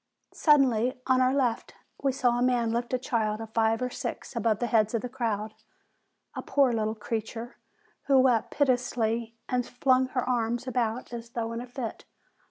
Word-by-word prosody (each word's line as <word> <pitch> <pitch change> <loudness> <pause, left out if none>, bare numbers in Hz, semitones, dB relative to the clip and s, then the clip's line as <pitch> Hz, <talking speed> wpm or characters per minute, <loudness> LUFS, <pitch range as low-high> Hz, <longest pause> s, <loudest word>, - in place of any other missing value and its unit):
Suddenly, 255 -6 +3
on 260 -1 +3
our 255 0 +4
left, 255 -4 -1 0.3
we 275 - +2
saw 245 -2 +1
a - - -1
man 245 -2 +2
lift 235 +1 -2
a 255 - +2
child 220 -4 -1
of 225 -1 -7
five 225 +1 +2
or 250 - -2
six - - -6
above 225 -2 +1
the 240 - -1
heads 220 -1 +2
of 230 - -1
the 250 - -4
crowd, 220 -4 -2 0.8
a - - -5
poor, 275 -4 +2
little 220 -1 -1
creature, 225 +2 -5 0.5
who 275 -1 +5
wept 255 -4 +3
piteously, 235 -4 0
and 250 -1 0
flung 255 +1 +2
her 255 -1 -2
arms 240 0 0
about 245 -2 -2
as 235 0 -6
though 230 -1 -3
in 230 - -4
a 250 - -8
fit. 245 -2 -6
240 Hz, 180 wpm, -28 LUFS, 225-255 Hz, 0.8 s, who